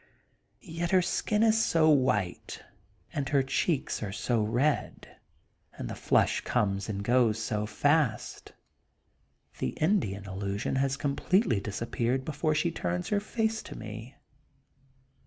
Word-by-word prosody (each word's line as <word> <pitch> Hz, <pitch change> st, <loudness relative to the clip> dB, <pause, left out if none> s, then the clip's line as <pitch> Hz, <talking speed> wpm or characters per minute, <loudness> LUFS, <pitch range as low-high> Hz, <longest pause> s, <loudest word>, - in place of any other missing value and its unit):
Yet 170 Hz, -1 st, -3 dB
her 185 Hz, -1 st, +4 dB
skin 210 Hz, +4 st, +1 dB
is 220 Hz, -1 st, +4 dB
sd 160 Hz, -8 st, +4 dB
white 110 Hz, -9 st, -1 dB, 0.5 s
and 145 Hz, -4 st, -2 dB
her 140 Hz, -2 st, +3 dB
cheeks 140 Hz, +2 st, -1 dB
are 105 Hz, -3 st, -3 dB
so 115 Hz, +3 st, 0 dB
red, 120 Hz, +8 st, -1 dB, 0.6 s
and -, -, -5 dB
the -, -, -5 dB
flush -, -, +2 dB
comes 100 Hz, 0 st, 0 dB
and 100 Hz, -1 st, -3 dB
goes 120 Hz, -1 st, +3 dB
so 105 Hz, -1 st, -2 dB
fast, 145 Hz, -2 st, 0 dB, 1.1 s
the 65 Hz, -, -3 dB
Indian 155 Hz, -, +1 dB
illusion 100 Hz, +4 st, -3 dB
has 135 Hz, 0 st, +1 dB
Com 140 Hz, -1 st, -1 dB
pletely 185 Hz, -, +2 dB
disappeared 115 Hz, +5 st, -2 dB
when 155 Hz, +1 st, 0 dB
she 160 Hz, +3 st, +1 dB
turns 90 Hz, -, -3 dB
her 205 Hz, -, +2 dB
face 220 Hz, +1 st, -1 dB
to -, -, -10 dB
me. 110 Hz, +4 st, -8 dB
130 Hz, 135 wpm, -29 LUFS, 105-160 Hz, 1.1 s, her